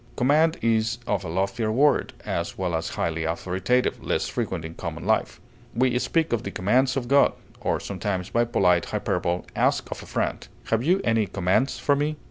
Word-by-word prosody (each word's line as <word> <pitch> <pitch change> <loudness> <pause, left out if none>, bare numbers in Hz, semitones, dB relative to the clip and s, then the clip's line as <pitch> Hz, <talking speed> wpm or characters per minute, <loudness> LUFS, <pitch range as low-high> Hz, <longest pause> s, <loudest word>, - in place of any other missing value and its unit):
Command 155 +6 +3
is 115 0 +2
a 105 - +1
loftier 100 +6 -1
word, 140 +5 +3
as 85 0 -3
well 90 -2 -2
as 80 0 -1
highly 80 -1 -2
authoritative, 95 +9 0
less - - 0
frequent 95 -9 -3
in 80 - -7
common - - -6
life; - - +1 0.4
we 125 +1 +2
speak 160 +1 0
of 115 - +1
the - - -5
commands 125 +9 +2
of 125 -3 -2
God, 140 +2 +5 0.3
or - - 0
sometimes, 95 -1 -3
by 120 - +3
polite 90 -7 +2
hyperbole, 90 -4 -1
ask - - +1
of - - -5
a - - -12
friend, - - -2 0.2
"Have 115 0 +3
you 180 +7 +3
any 115 -2 +2
commands 95 +8 +1
for 145 - +2
me?" 150 +2 -1
110 Hz, 180 wpm, -25 LUFS, 90-130 Hz, 0.4 s, God